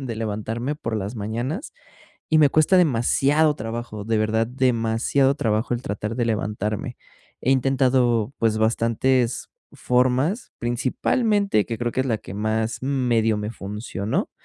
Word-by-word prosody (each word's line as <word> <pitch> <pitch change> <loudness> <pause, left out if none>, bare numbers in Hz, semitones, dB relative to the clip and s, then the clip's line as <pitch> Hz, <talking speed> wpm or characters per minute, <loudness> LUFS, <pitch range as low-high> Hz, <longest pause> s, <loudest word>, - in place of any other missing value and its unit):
de 125 -4 -4
levantarme 115 +5 -3
por 115 -6 -3
las 105 +3 -4
mañanas, 120 - -4 0.6
y 155 - +4
me 145 -2 +6
cuesta 155 +6 +4
demasiado 145 0 +3
trabajo, 115 -2 -5
de 115 0 0
verdad, 110 +1 +1
demasiado 125 +2 +1
trabajo 115 -2 0
el 120 - -5
tratar 105 +1 -4
de 120 - +1
levantarme. 105 +1 -2 0.4
He 130 - 0
intentado, 130 -3 +2
pues, 110 -1 +1
bastantes 115 +2 +1 0.2
formas, 130 - +1
principalmente, 135 - +1
que 115 - -3
creo 120 0 -1
que 130 - 0
es 130 - -1
la 115 -4 0
que 95 - -10
más, 110 +2 -1
medio 120 -5 +1
me 105 +1 -3
funcionó, 105 -1 -4
120 Hz, 140 wpm, -23 LUFS, 110-130 Hz, 0.6 s, me